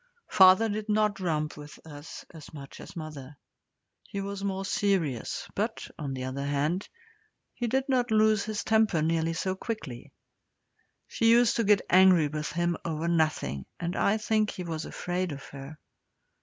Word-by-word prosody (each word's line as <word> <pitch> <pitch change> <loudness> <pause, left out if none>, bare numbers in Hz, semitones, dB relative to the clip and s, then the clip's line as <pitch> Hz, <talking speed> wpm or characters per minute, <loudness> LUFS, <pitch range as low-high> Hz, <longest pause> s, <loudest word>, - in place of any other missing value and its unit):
Father 190 +3 +7
did 215 0 -4
not 210 -1 +1
romp 155 -4 -1
with 150 0 -10
us 145 -1 -10
as 160 -3 -11
much 140 -2 -10
as - - -11
mother. 150 -4 -8 0.6
He 200 - -7
was 200 0 -5
more 195 -1 -2
serious, 180 - -1
but, - - -3
on 140 -3 -4
the 130 - -5
other 130 +2 -4
hand, 145 +7 -1 0.6
he 240 - -3
did 265 +4 0
not 250 -3 +1
lose 215 -1 +3
his 215 -1 -3
temper 220 -8 +2
nearly 165 0 +1
so 185 +3 -1
quickly. 190 - -6 1.0
She 230 - +1
used 235 0 +5
to 230 - +2
get 205 -1 +3
angry 180 -4 +5
with 150 0 -4
him 175 0 0
over 165 0 -3
nothing, 155 - 0
and 175 +1 -3
I 205 +2 +2
think 215 -1 +1
he 180 - -6
was 165 -2 -4
afraid 180 0 -3
of 140 - -9
her. 140 +2 -9
175 Hz, 165 wpm, -28 LUFS, 150-210 Hz, 1.0 s, Father